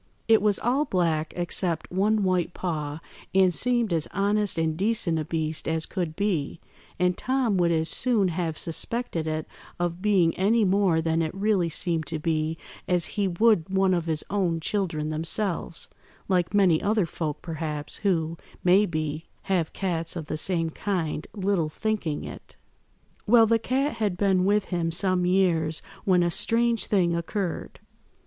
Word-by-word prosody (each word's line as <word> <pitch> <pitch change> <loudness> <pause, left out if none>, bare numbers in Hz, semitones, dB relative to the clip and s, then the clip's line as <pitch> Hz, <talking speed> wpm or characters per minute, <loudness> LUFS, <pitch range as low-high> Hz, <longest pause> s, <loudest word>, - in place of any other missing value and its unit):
It 225 -2 +5
was 210 -1 +2
all 265 +5 +1
black 165 - 0
except 175 -1 -1
one 205 +3 +2
white 180 -2 0
paw, 155 -4 -3 0.3
and 190 -2 +5
seemed 240 -2 +1
as 160 -2 0
honest 205 0 +1
and 160 -1 0
decent 190 -3 0
a 155 - -3
beast 160 -1 -2
as 160 0 0
could 175 -5 -4
be, 175 -7 -1 0.4
and 180 0 +2
Tom 255 -3 0
would 175 -1 +2
as 160 -1 +1
soon 215 0 +3
have 165 -2 -2
suspected 170 -1 -2
it 155 0 -3 0.3
of 175 0 -2
being 190 -5 +3
any 215 +4 +3
more 185 -4 +2
than 165 0 +1
it 160 -1 -1
really 195 -3 +1
seemed 165 0 -2
to 165 - -2
be 155 0 -1 0.3
as 180 -2 +3
he 205 -2 0
would 190 -1 +2
one 190 0 +2
of 170 -2 -1
his 155 -2 +1
own 180 -5 0
children 160 -4 -2
themselves, 165 +2 -2 0.4
like 180 -3 +1
many 190 -6 +3
other 210 -2 +1
folk, 155 -2 -4
perhaps, 155 -3 -4
who, 165 -5 0 0.3
may 190 +4 +5
be, 155 -1 -3 0.2
have 175 -5 0
cats 165 -4 -1
of 165 -3 -5
the 155 - -4
same 165 0 0
kind, 165 -5 -3
little 190 -5 0
thinking 190 -4 -2
it. - - -10 0.7
"Well, 225 +1 +7
the 225 +1 +2
cat 265 +3 -1
had 205 -5 -1
been 190 -2 +2
with 205 +1 +2
him 170 -2 -1
some 180 +1 +1
years 170 -4 +2 0.3
when 180 -2 +4
a 175 - +1
strange 230 +5 +1
thing 175 -4 +2
occurred. 170 +1 -4
180 Hz, 165 wpm, -26 LUFS, 160-200 Hz, 0.7 s, Well